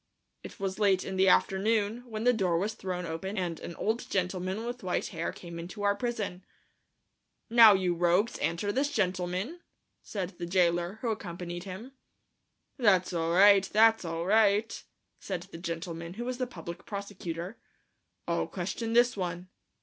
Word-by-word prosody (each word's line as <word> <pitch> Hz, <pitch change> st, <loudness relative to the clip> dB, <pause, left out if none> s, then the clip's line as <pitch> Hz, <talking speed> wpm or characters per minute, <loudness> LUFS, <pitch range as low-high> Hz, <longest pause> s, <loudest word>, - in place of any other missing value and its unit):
It -, -, -11 dB
was 195 Hz, 0 st, -3 dB
late 195 Hz, -3 st, +3 dB
in 190 Hz, -, -4 dB
the 190 Hz, 0 st, +3 dB
afternoon 215 Hz, +5 st, +2 dB
when 215 Hz, -1 st, -4 dB
the 245 Hz, +1 st, +5 dB
door 185 Hz, -7 st, +1 dB
was 205 Hz, +5 st, -1 dB
thrown 180 Hz, -3 st, -4 dB
open 180 Hz, +6 st, -4 dB
and 175 Hz, -3 st, -2 dB
an 170 Hz, -, -7 dB
old 225 Hz, +3 st, -2 dB
gentleman 185 Hz, +3 st, -2 dB
with 245 Hz, +1 st, -5 dB
white 180 Hz, -2 st, -1 dB
hair 165 Hz, 0 st, -3 dB
came 170 Hz, -1 st, -9 dB
into 185 Hz, +5 st, -7 dB
our 200 Hz, 0 st, +3 dB
prison. 205 Hz, -5 st, -3 dB, 1.1 s
"Now, 230 Hz, -3 st, +9 dB
you 185 Hz, -2 st, +1 dB
rogues, 175 Hz, +6 st, +1 dB
answer 170 Hz, +5 st, -1 dB
this 275 Hz, +5 st, 0 dB
gentleman," 185 Hz, -, -1 dB, 0.4 s
said 190 Hz, -2 st, -5 dB
the 175 Hz, -, -4 dB
jailer, 175 Hz, 0 st, +2 dB
who 235 Hz, -, 0 dB
accompanied 175 Hz, -3 st, -6 dB
him. 200 Hz, +7 st, -8 dB, 0.9 s
"That's 190 Hz, -6 st, +3 dB
all 165 Hz, 0 st, 0 dB
right, 195 Hz, +1 st, +6 dB
that's 225 Hz, 0 st, +5 dB
all 165 Hz, 0 st, -3 dB
right," 215 Hz, +2 st, +3 dB, 0.4 s
said 185 Hz, -3 st, -4 dB
the 165 Hz, -, -8 dB
gentleman, 170 Hz, 0 st, -5 dB
who 240 Hz, +3 st, -5 dB
was 255 Hz, 0 st, -4 dB
the 255 Hz, -, -1 dB
public 170 Hz, -6 st, -9 dB
prosecutor, 200 Hz, -2 st, -6 dB, 0.7 s
"I'll -, -, 0 dB
question 230 Hz, -1 st, -4 dB
this 240 Hz, +1 st, +4 dB
one." 180 Hz, -1 st, -4 dB
190 Hz, 160 wpm, -29 LUFS, 175-220 Hz, 1.1 s, Now